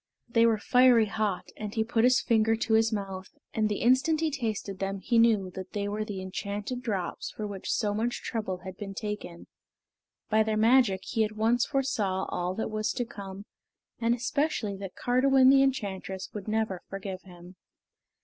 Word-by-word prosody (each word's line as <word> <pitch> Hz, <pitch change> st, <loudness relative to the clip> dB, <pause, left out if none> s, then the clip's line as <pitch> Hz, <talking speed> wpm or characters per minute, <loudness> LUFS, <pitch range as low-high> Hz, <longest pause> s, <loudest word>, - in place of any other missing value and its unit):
They 230 Hz, -1 st, +4 dB
were 225 Hz, -1 st, +3 dB
fiery 245 Hz, +1 st, +5 dB
hot, 210 Hz, -2 st, -2 dB
and 210 Hz, -1 st, -6 dB
he 220 Hz, -, +2 dB
put 225 Hz, +1 st, +2 dB
his 255 Hz, 0 st, +4 dB
finger 225 Hz, -2 st, +3 dB
to 225 Hz, 0 st, -1 dB
his 225 Hz, +1 st, +4 dB
mouth, 195 Hz, -2 st, -4 dB, 0.2 s
and 215 Hz, -1 st, +1 dB
the 205 Hz, -, -2 dB
instant 265 Hz, +6 st, +3 dB
he 320 Hz, -1 st, 0 dB
tasted 215 Hz, -7 st, -3 dB
them 195 Hz, 0 st, -2 dB
he 230 Hz, +4 st, +1 dB
knew 215 Hz, -5 st, +3 dB
that 190 Hz, 0 st, -8 dB
they 205 Hz, -1 st, -2 dB
were 210 Hz, +1 st, -2 dB
the 200 Hz, -3 st, -5 dB
enchanted 205 Hz, +6 st, -4 dB
drops 195 Hz, -8 st, -3 dB
for 215 Hz, -, -6 dB
which 200 Hz, -2 st, -6 dB
so 205 Hz, -1 st, 0 dB
much 230 Hz, +3 st, -2 dB
trouble 190 Hz, -6 st, -3 dB
had 185 Hz, -1 st, -7 dB
been 195 Hz, -2 st, -7 dB
taken. 210 Hz, -5 st, -5 dB, 0.8 s
By 220 Hz, 0 st, +3 dB
their 215 Hz, 0 st, +1 dB
magic 225 Hz, -4 st, +4 dB
he 225 Hz, -, 0 dB
at 215 Hz, 0 st, -2 dB
once 235 Hz, +2 st, +2 dB
foresaw 210 Hz, -9 st, 0 dB
all 180 Hz, +1 st, -2 dB
that 220 Hz, -, -3 dB
was 215 Hz, +1 st, -1 dB
to 245 Hz, -, -2 dB
come, 200 Hz, -2 st, -9 dB, 0.5 s
and 235 Hz, 0 st, +2 dB
especially 245 Hz, -4 st, -1 dB
that 195 Hz, -1 st, -8 dB
Cardiwen 260 Hz, +1 st, +4 dB
the 270 Hz, 0 st, +6 dB
enchantress 195 Hz, -8 st, -2 dB
would 205 Hz, -1 st, -7 dB
never 215 Hz, -4 st, -1 dB
forgive 195 Hz, -1 st, -6 dB
him. 180 Hz, -1 st, -14 dB
215 Hz, 185 wpm, -28 LUFS, 195-235 Hz, 0.8 s, the